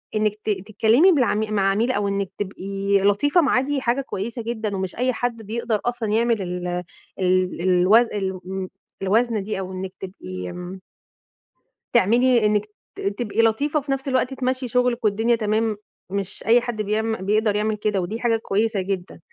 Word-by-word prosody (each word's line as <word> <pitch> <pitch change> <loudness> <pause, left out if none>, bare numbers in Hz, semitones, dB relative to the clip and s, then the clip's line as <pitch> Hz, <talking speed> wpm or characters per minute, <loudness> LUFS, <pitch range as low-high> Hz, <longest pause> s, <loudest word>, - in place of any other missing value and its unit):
إنَّك 215 -1 +1
ت - - -3
تتكلَّمي 220 - +3
بالعم 245 -7 +2
مع 195 -1 +3
عميل، 230 +6 +1
أو 205 -4 0
إنَّك 200 -1 -2
تبقي 200 0 -1
لطيفة 205 - +3
معاه، 255 -3 +3
دي 275 0 -1
حاجة 245 +3 +1
كويِسة 235 0 -5
جدًا 220 -3 -3
ومش 190 -1 -3
أي 255 +1 +1
حد 235 -1 -2
بيقدَر 220 0 -2
أصلًا 240 -3 -1
يعمَل 225 -1 +2
ال 180 0 -4 0.5
ال 185 -1 +1
الوز 185 +6 +5
ال 190 -2 -1
م 190 0 -4 0.3
الوزن 220 +2 +1
دي، 205 -1 -3
أو 190 0 -5
إنَّك 185 0 -5
تبقي 95 - -7
آمم 180 - -7 1.1
تعملي 235 +1 +4
إنَّك 210 0 +2 0.3
ت - - -8
تبقي 210 +2 0
لطيفة 280 +7 +2
وفي 280 0 -5
نفس 270 +1 -2
الوقت 260 0 +1
تمشي 255 0 -1
شغلِك 245 0 +1
والدنيا 225 +3 +3
تمام، 215 0 0 0.3
مش 195 -1 -4
أي 235 +1 +6
حد 235 -3 -3
بيعم 220 +2 0
بيقدَر 210 0 +2
يعمل 215 +1 0
كده، 205 -2 0
ودي 215 +6 -4
حاجة 230 -2 +2
كويِسة 215 -1 0
جدًا. 185 -2 -4
215 Hz, 170 wpm, -23 LUFS, 195-240 Hz, 1.1 s, أي